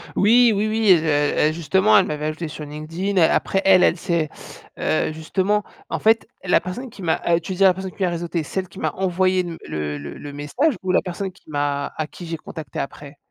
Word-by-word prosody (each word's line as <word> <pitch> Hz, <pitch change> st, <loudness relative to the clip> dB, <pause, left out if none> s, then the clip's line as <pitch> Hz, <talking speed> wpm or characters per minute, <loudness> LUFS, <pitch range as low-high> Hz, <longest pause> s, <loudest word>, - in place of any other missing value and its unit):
Oui, 235 Hz, +3 st, +5 dB
oui, 205 Hz, +2 st, +1 dB
oui, 215 Hz, -1 st, +3 dB
heu, 150 Hz, -1 st, +2 dB
heu, -, -, -1 dB
justement 190 Hz, +6 st, +3 dB
elle -, -, +5 dB
m'avait 150 Hz, 0 st, -3 dB
ajouté 155 Hz, +2 st, -3 dB
sur 155 Hz, 0 st, -8 dB
LinkedIn. 165 Hz, +7 st, -4 dB
Après 195 Hz, +4 st, +2 dB
elle, 190 Hz, -1 st, +6 dB
elle 170 Hz, -, +3 dB
s'est, 170 Hz, -4 st, -1 dB, 0.5 s
heu, 155 Hz, -, 0 dB
justement 190 Hz, +6 st, 0 dB, 0.3 s
en -, -, -2 dB
fait 225 Hz, +1 st, +3 dB, 0.2 s
la 180 Hz, -, +4 dB
personne 185 Hz, +9 st, -6 dB
qui 215 Hz, -, -13 dB
m'a, 165 Hz, -3 st, 0 dB
heu 170 Hz, 0 st, +4 dB
tu 170 Hz, +3 st, -5 dB
disais 195 Hz, +2 st, +3 dB
la 185 Hz, -, +6 dB
personne 190 Hz, +1 st, -6 dB
qui 195 Hz, -, -4 dB
m'a 180 Hz, -, +2 dB
réseauté, 170 Hz, -1 st, -3 dB
celle 185 Hz, +5 st, -3 dB
qui -, -, -12 dB
m'a -, -, 0 dB
envoyé 185 Hz, 0 st, +1 dB, 0.2 s
le 75 Hz, -1 st, -3 dB
le 70 Hz, 0 st, -7 dB
le 145 Hz, -1 st, -8 dB
message 235 Hz, -, 0 dB
ou 185 Hz, -, 0 dB
la 185 Hz, -, +3 dB
personne 190 Hz, +1 st, -4 dB
qui 185 Hz, -, -22 dB
m'a 145 Hz, -1 st, -1 dB
à 155 Hz, -, -2 dB
qui 175 Hz, -, -10 dB
j'ai 165 Hz, 0 st, -4 dB
contacté 155 Hz, -3 st, -8 dB
après? 140 Hz, +1 st, -7 dB
175 Hz, 220 wpm, -22 LUFS, 155-195 Hz, 0.5 s, elle